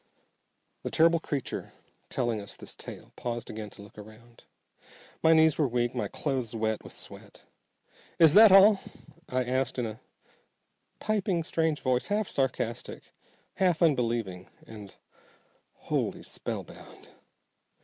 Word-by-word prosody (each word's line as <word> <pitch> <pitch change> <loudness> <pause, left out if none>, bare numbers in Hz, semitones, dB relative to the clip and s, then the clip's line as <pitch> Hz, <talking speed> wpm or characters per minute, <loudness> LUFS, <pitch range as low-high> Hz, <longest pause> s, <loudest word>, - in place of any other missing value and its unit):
The - - -4
terrible 165 +1 +4
creature 145 -4 -4 0.4
telling 120 -4 -1
us 100 - -8
this - - -9
tale - - -11
paused 120 -1 -5
again 110 -1 -6
to 100 - -11
look 105 +1 -14
around. 110 +3 -15 0.8
My 160 - +5
knees 160 -1 +5
were 150 - +3
weak, 120 0 0
my - - -2
clothes 130 -6 -3
wet 110 -1 -1
with - - -11
sweat. - - -12 0.7
"Is 160 -3 +6
that 215 -1 +9
all?" 195 +1 +7 0.5
I 130 0 0
asked 130 +1 -1
in 125 - 0
a 110 0 -6 1.0
piping, 195 -5 0
strange 160 -1 -1
voice, 130 -1 0
half 210 0 0
sarcastic, 130 -4 -3 0.4
half 180 -3 +2
unbelieving, 115 - 0 0.2
and 105 -3 -11 0.8
wholly - - -3
spellbound. - - -7
130 Hz, 130 wpm, -28 LUFS, 115-160 Hz, 1.0 s, that